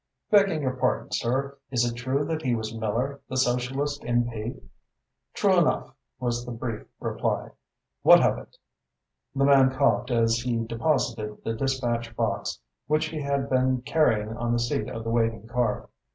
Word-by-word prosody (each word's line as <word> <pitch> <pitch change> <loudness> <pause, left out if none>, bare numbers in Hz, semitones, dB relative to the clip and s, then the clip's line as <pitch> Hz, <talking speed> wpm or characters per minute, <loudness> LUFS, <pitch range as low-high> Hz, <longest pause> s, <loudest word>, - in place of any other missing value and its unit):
"Begging 195 -7 +4
your 130 -1 -1
pardon, 125 0 0
sir, 135 +3 -1
is 120 -2 +2
it 120 - -1
true 130 +4 -1
that 160 0 -2
he 125 -5 +1
was 110 -1 -4
Miller, 120 +6 -2
the 130 - -3
Socialist 130 +3 0
M.P.?" 120 0 -1 0.8
"True - - +3
enough," - - +1 0.3
was 120 -1 -1
the 120 - -7
brief 115 -1 -5
reply. - - -2 0.5
"What - - +8
of - - +1
it?" - - -15 0.8
The 140 0 +3
man 135 -2 +6
coughed 130 -2 +1
as 115 -1 +3
he 115 -2 -1
deposited 115 -3 -1
the 115 - -1
dispatch 120 -2 -1
box 110 -3 -1 0.3
which 155 +1 +1
he 155 -1 -4
had 140 -1 -1
been 130 -1 +1
carrying 110 -8 +1
on 120 0 -1
the - - +2
seat 120 -2 -1
of 115 - -5
the 115 - -2
waiting 115 -2 0
car. 120 -2 -1
120 Hz, 165 wpm, -26 LUFS, 115-135 Hz, 0.8 s, What